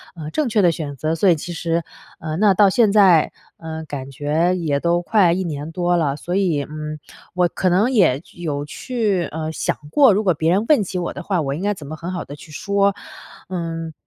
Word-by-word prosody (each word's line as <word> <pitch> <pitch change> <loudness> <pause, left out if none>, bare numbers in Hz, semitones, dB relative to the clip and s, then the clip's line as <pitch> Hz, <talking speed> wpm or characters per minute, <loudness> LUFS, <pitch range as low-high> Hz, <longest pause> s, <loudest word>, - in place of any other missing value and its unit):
呃， 155 -2 -7
正 300 -6 0
确 215 -2 +2
的 175 -2 +4
选 145 -4 -5
择。 155 +3 -1
所 185 +3 +3
以 170 - +5
其 175 +3 -6
实 165 0 -1 0.4
呃， 155 -1 -4
那 205 -1 +4
到 200 +1 +5
现 215 0 +3
在， 190 -6 +5 0.3
呃， 160 -1 -6
感 140 -2 -7
觉 155 +6 0
也 150 -5 0
都 170 +2 +1
快 185 -2 +3
1 190 +1 -1
年 155 -1 -5
多 175 +1 0
了， 145 -4 0
所 175 +4 -4
以， 170 -8 +1
嗯， 155 0 -6 0.3
我 180 -1 +2
可 185 +2 -1
能 200 +8 +3
也 160 - +3
有 145 -4 -4
去， 210 - -1
呃， 160 0 -4
想 - - -1 0.2
过， 270 -8 +6
如 210 +3 +1
果 185 -3 +3
别 160 +2 0
人 200 +5 +2
问 290 -9 +4
起 180 0 -4
我 175 - -3
的 185 - -7
话， 185 -4 0
我 135 -1 -2
应 170 - -6
该 205 0 +1
怎 150 -7 -10
么 155 - -6
很 170 +3 -6
好 175 - -4
地 145 - -9
去 155 - -14
说。 200 +4 +1 0.6
嗯， 165 -3 -4
170 Hz, 240 characters per minute, -20 LUFS, 155-190 Hz, 0.6 s, 过